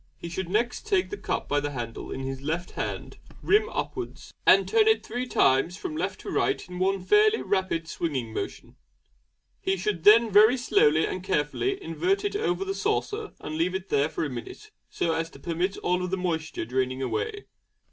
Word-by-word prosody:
He 170 Hz, -, -7 dB
should 175 Hz, +1 st, -4 dB
next 235 Hz, -, -1 dB
take 400 Hz, -3 st, +1 dB
the -, -, -2 dB
cup -, -, -3 dB
by 145 Hz, -, +1 dB
the 145 Hz, 0 st, -2 dB
handle 120 Hz, -5 st, -6 dB
in 135 Hz, -, -5 dB
his 135 Hz, 0 st, -4 dB
left 165 Hz, +5 st, -3 dB
hand, -, -, -5 dB, 0.2 s
rim 425 Hz, +2 st, +3 dB
upwards, -, -, -5 dB
and -, -, +6 dB
turn 440 Hz, -1 st, +4 dB
it 440 Hz, -, +3 dB
three 245 Hz, +3 st, -3 dB
times 150 Hz, -, +2 dB
from 345 Hz, -5 st, -5 dB
left -, -, -3 dB
to -, -, -6 dB
right 405 Hz, -, 0 dB
in 180 Hz, 0 st, -7 dB
one 190 Hz, 0 st, +1 dB
fairly 425 Hz, -, +4 dB
rapid 185 Hz, -4 st, -1 dB
swinging 130 Hz, -10 st, -3 dB
movement. -, -, -6 dB, 0.8 s
He 195 Hz, 0 st, 0 dB
should 185 Hz, -2 st, -2 dB
then 225 Hz, +1 st, +7 dB
very 215 Hz, +5 st, +7 dB
slowly 160 Hz, -10 st, +3 dB
and 185 Hz, -, -4 dB
carefully 190 Hz, -, 0 dB
invert 390 Hz, +3 st, 0 dB
it 405 Hz, -, -1 dB
over 395 Hz, -2 st, 0 dB
the 390 Hz, -, -2 dB
saucer 420 Hz, +2 st, -2 dB
and 155 Hz, -, -5 dB
leave 180 Hz, +3 st, +1 dB
it 190 Hz, 0 st, -5 dB
there 145 Hz, +2 st, +2 dB
for -, -, -2 dB
a -, -, -1 dB
minute, 130 Hz, -, -8 dB, 0.2 s
so 165 Hz, -, 0 dB
as 165 Hz, 0 st, -2 dB
to -, -, -15 dB
permit 175 Hz, +3 st, -2 dB
of -, -, -11 dB
all 180 Hz, 0 st, +1 dB
moisture 180 Hz, -7 st, -2 dB
draining 130 Hz, +2 st, -1 dB
away. 410 Hz, -, -3 dB
185 Hz, 195 wpm, -27 LUFS, -, 0.8 s, then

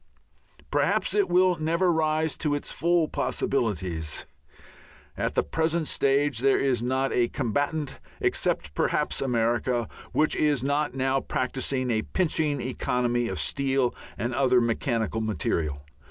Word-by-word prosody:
Perhaps -, -, +1 dB
it 410 Hz, -2 st, +2 dB
will 180 Hz, -1 st, +4 dB
never 170 Hz, +3 st, +2 dB
rise 155 Hz, -1 st, +1 dB
to 150 Hz, -2 st, 0 dB
its 145 Hz, -, -2 dB
full 170 Hz, -1 st, +2 dB
possibilities. 90 Hz, -, -1 dB, 0.9 s
At -, -, -2 dB
the -, -, +3 dB
present 160 Hz, 0 st, 0 dB
stage 140 Hz, -2 st, +1 dB
there 135 Hz, +2 st, +3 dB
is 130 Hz, -4 st, +1 dB
not 130 Hz, +2 st, 0 dB
a 120 Hz, -1 st, +3 dB
combatant, 145 Hz, +6 st, -2 dB, 0.2 s
except 75 Hz, 0 st, 0 dB
perhaps -, -, 0 dB
America, 120 Hz, -1 st, 0 dB, 0.2 s
which 155 Hz, -, +2 dB
is 145 Hz, -4 st, +1 dB
not 145 Hz, 0 st, 0 dB
now 135 Hz, 0 st, +1 dB
practising 130 Hz, 0 st, -2 dB
a 110 Hz, -1 st, +1 dB
pinching 155 Hz, -2 st, 0 dB
economy 120 Hz, -1 st, 0 dB
of 95 Hz, -5 st, -4 dB
steel 130 Hz, -, 0 dB, 0.2 s
and 120 Hz, +2 st, -2 dB
other 130 Hz, -1 st, +3 dB
mechanical 115 Hz, -1 st, -1 dB
material. 85 Hz, -9 st, -1 dB
130 Hz, 130 wpm, -26 LUFS, 120-150 Hz, 0.9 s, will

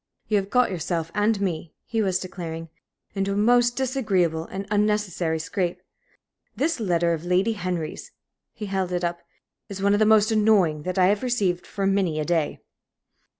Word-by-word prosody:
"You 215 Hz, -, +2 dB
have 195 Hz, 0 st, -2 dB
got 250 Hz, -1 st, +3 dB
yourself 165 Hz, -2 st, -2 dB
and 210 Hz, 0 st, +1 dB
me," 170 Hz, -5 st, -3 dB
he 225 Hz, -1 st, -1 dB
was 190 Hz, -3 st, +1 dB
declaring, 165 Hz, -3 st, -6 dB, 0.4 s
"into 195 Hz, 0 st, -1 dB
a -, -, -2 dB
most 240 Hz, +3 st, +4 dB
disagreeable 200 Hz, -, 0 dB
and 195 Hz, +3 st, -6 dB
unnecessary 210 Hz, -6 st, +1 dB
scrape. 175 Hz, +2 st, -2 dB, 0.8 s
This 315 Hz, 0 st, 0 dB
letter 170 Hz, -5 st, +1 dB
of 160 Hz, -1 st, -4 dB
Lady 180 Hz, +5 st, +2 dB
Henry's" 180 Hz, -5 st, -4 dB, 0.4 s
he 210 Hz, -, -7 dB
held 190 Hz, -2 st, -2 dB
it 175 Hz, 0 st, -1 dB
up 170 Hz, 0 st, -2 dB, 0.5 s
"is 200 Hz, -1 st, -6 dB
one 200 Hz, +1 st, +3 dB
of 205 Hz, -, +2 dB
the 215 Hz, -, +4 dB
most 215 Hz, 0 st, +5 dB
annoying 205 Hz, -8 st, +3 dB
that 185 Hz, -, -3 dB
I 185 Hz, -, +5 dB
have 200 Hz, +2 st, +2 dB
received 200 Hz, -8 st, 0 dB
for 195 Hz, -, -3 dB
many 195 Hz, -5 st, +1 dB
a 155 Hz, -, -1 dB
day. 165 Hz, -2 st, 0 dB
195 Hz, 175 wpm, -24 LUFS, 175-210 Hz, 0.8 s, most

